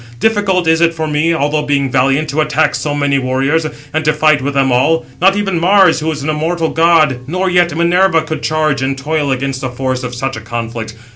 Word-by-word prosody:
Difficult 205 -5 +1
is 160 0 +3
it 165 -1 +2
for 160 -1 -3
me, 155 +2 0
although 150 -1 0
being 140 -2 -1
valiant, 135 +4 +1
to 155 +2 0
attack 150 0 +1
so 145 -1 -2
many 145 -1 +1
warriors, 135 +5 0 0.3
and 155 0 -1
to 155 0 +2
fight 155 -1 +2
with 140 +1 -3
them 135 -1 +2
all. 130 +5 +1 0.2
Not 190 +2 +4
even 195 -4 -1
Mars, 185 -1 +4
who 155 +1 -2
is 150 -3 -5
an 150 - -3
immortal 160 +2 -1
god, 160 -5 +3
nor 185 +4 -1
yet 175 -2 +2
Minerva, 170 0 +2
could 160 0 -5
charge 155 -3 0
and 135 0 -2
toil 145 +1 -2
against 135 0 -3
the 130 - -3
force 130 0 -3
of 125 0 -5
such 135 +1 -3
a 110 - -7
conflict. 115 -1 -6
155 Hz, 220 wpm, -14 LUFS, 135-165 Hz, 0.3 s, Not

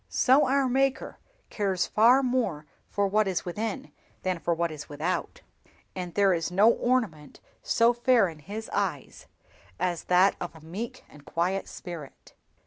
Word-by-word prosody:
So 265 +2 +4
our 270 0 +2
Maker 265 +1 0 0.3
cares 195 -4 0
far 245 +5 +4
more 240 - -1 0.2
for 205 - 0
what 210 +1 +2
is 185 -3 -2
within 210 +4 -4 0.3
than 185 -2 -1
for 170 - -2
what 170 0 0
is 150 -1 -9
without, 155 +5 -3 0.5
and 180 -2 -6
there 200 -2 +4
is 165 -1 -1
no 200 +6 +5
ornament 225 - -1 0.2
so 230 +1 +3
fair 240 -3 +3
in 160 -3 -9
His 210 +8 -7
eyes 180 -9 -3 0.5
as 175 -2 -2
that 185 +2 +4
of 175 -1 -5
a 160 - -13
meek 230 +10 -6
and 150 - -16
quiet 180 +5 -1
spirit." 165 -6 -10
195 Hz, 155 wpm, -27 LUFS, 170-235 Hz, 0.5 s, no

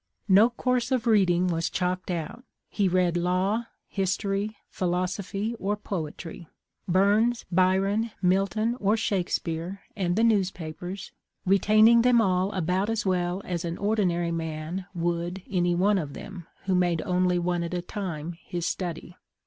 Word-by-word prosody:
No 205 +4 +6
course 250 +1 -1
of 255 -3 +1
reading 185 -6 +4
was 165 -2 0
chalked 185 +1 -2
out. 170 +7 -4 0.3
He 200 -2 +1
read 180 -1 +2
law, 185 +6 +1 0.2
history, 195 +2 -1
philosophy, 185 +4 -2
or 205 +2 0
poetry; 170 -3 -6 0.4
Burns, 205 +6 +3
Byron, 190 +5 +2
Milton, 200 +5 +1
or 205 +2 +2
Shakespeare 190 -4 -2
and 180 -3 0
the 225 - +2
newspapers, 185 -4 -1 0.3
retain 210 +3 +5
ing 235 0 +6
them 245 0 +5
all 190 -2 +2
about 185 +3 0
as 225 -2 -1
well 180 0 0
as 175 -2 -3
an 170 0 -3
ordinary 185 -5 +1
man 165 +3 -4
would 175 +2 -2
any 175 -2 +1
one 195 +3 +3
of 145 -5 -5
them 190 -5 -9 0.2
who 190 - +1
made 175 -3 +2
only 180 0 +2
one 175 0 0
at 170 +1 -3
a 175 - -1
time 175 -5 -4
his 175 -1 -4
study. 175 -1 -4
185 Hz, 145 wpm, -26 LUFS, 175-205 Hz, 0.4 s, No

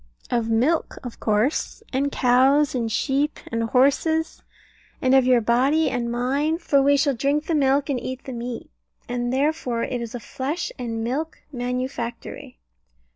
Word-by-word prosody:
Of 235 -2 0
milk 260 +9 +1
of 245 -2 -8
course, 220 - 0
and 280 +2 0
cows, 265 +4 +3
and 230 -3 -1
sheep, 280 +5 0
and 230 -1 0
horses; 285 +7 +2 0.6
and 260 0 +2
of 265 -1 +5
your 250 -2 +4
body 265 +8 +2
and 235 -2 -2
mine 275 +6 0
for 285 -5 +2
we 285 +1 +4
shall 280 0 +2
drink 280 +5 0
the 330 - -1
milk 280 -1 +2
and 275 -4 -1
eat 260 +1 -6
the 260 - -7
meat. 235 - -6 0.4
And 245 0 -2
therefore 265 -4 0
it 245 -2 -3
is 235 +1 -6
a - - -4
flesh 280 +9 -4
and 230 -2 -3
milk 290 +7 -3
manufactory. 250 - -4
260 Hz, 160 wpm, -23 LUFS, 240-285 Hz, 0.6 s, of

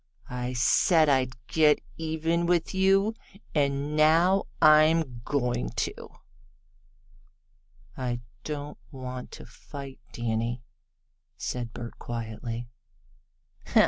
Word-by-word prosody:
I 125 0 -3
said 155 +6 +4
I'd 130 -2 +2
get 150 +1 +4 0.2
even 165 +1 -1
with 175 +1 +1
you, 195 +3 +3 0.4
and 140 0 0
now 165 +5 +4
I'm 155 -5 +5
going 125 - -1
to." - - -1 2.0
"I 120 -2 -3 0.2
don't 150 -1 -5
want 130 -1 -7
to - - -9
fight, 140 -2 -10
Danny," 115 +1 -2 0.7
said 120 -2 -4
Bert 120 0 -8
quietly. 115 0 -5 1.0
"Huh! - - +4
140 Hz, 95 wpm, -28 LUFS, 120-160 Hz, 2.0 s, I'm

